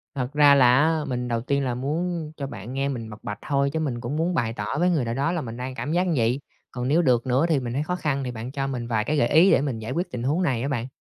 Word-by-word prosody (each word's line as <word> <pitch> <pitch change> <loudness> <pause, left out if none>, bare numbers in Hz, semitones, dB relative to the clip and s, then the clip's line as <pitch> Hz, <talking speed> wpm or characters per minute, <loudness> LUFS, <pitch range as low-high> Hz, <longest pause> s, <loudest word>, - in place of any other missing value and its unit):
Thật 130 +1 -3
ra 145 -1 +6
là 125 -1 +6
á, 155 0 +2
mình 125 -1 -2
đầu 115 -1 -1
tiên 140 +2 0
là 125 -1 -1
muốn 155 +4 -2
cho 140 -2 -4
bạn 120 -1 -8
nghe 135 +1 -1
mình 115 -4 -5
bộc 105 - -11
bạch 105 0 -5
thôi, 140 -1 +1
chứ 160 - 0
mình 125 -6 -2
cũng 125 +5 -3
muốn 170 +2 0
bày 115 -6 0
tỏ 105 +6 -3
với 180 +1 +3
người 150 -8 +1
nào 115 - -2
đó 140 +6 0
là 170 -3 -1
mình 115 -1 -7
đang 130 +1 -5
cảm 145 - -4
giác 180 +1 +2
như 170 - +1
vậy. 120 +4 +1 0.3
Còn 125 0 -3
nếu 160 +5 +3
được 125 -4 +2
nữa 130 +6 +3
thì 150 -4 +3
mình 120 -2 -4
thấy 145 +3 0
khó 180 +3 -2
khăn 140 -5 -1
thì 125 - -3
bạn 120 +2 -6
cho 135 -1 -2
mình 120 -3 -4
vài 110 -2 0
cái 150 +7 -1
gợi 120 - +3
ý 175 +5 +5
để - - +4
mình 130 -6 -2
giải 110 +3 -5
quyết 175 +6 -2
tình 120 -1 -4
huống 150 +8 +1
này 130 -7 0
á 135 - -1
bạn. 125 -3 -2
135 Hz, 320 wpm, -24 LUFS, 120-150 Hz, 0.3 s, ra